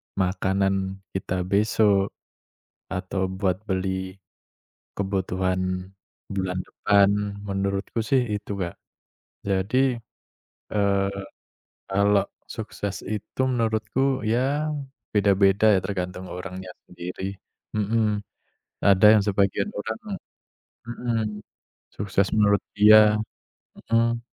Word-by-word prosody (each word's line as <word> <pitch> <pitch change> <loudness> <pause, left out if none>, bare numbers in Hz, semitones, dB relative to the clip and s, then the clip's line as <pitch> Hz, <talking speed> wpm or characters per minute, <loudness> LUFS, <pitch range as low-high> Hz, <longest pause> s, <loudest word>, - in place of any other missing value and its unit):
makanan 95 0 0
kita 95 -1 -2
besok, 100 0 +2 0.8
atau 95 0 -2
buat 95 -2 +1
beli 95 0 -2 0.8
kebutuhan 95 -1 -1 0.4
bulan 95 -2 -2
depan. 100 -1 +4 0.4
Menurutku 100 +2 -2
sih 130 +1 +3
itu, 105 - -6
Kak. 85 -2 -3 0.7
Jadi, 120 +7 +2 0.8
eee, 100 -1 +2 0.8
kalau 100 +1 +3 0.2
sukses 100 -2 -5
itu 105 +4 -4
menurutku, 120 +2 0
ya 135 +7 +1 0.4
beda-beda 100 0 +4
ya, - - +3
tergantung 90 -1 -4
orangnya 90 +1 -7 0.2
sendiri. 90 +2 -6 0.4
Mhm. 105 0 +1 0.7
Ada 100 +1 +6
yang 105 - +4
sebagian 100 - +1
orang - - -4 0.9
mhm, 120 0 -2 0.8
sukses 100 -1 0
menurut 100 -1 +4
dia 105 0 +8 0.7
Mhm. 115 +1 +2
100 Hz, 85 wpm, -25 LUFS, 95-110 Hz, 0.9 s, dia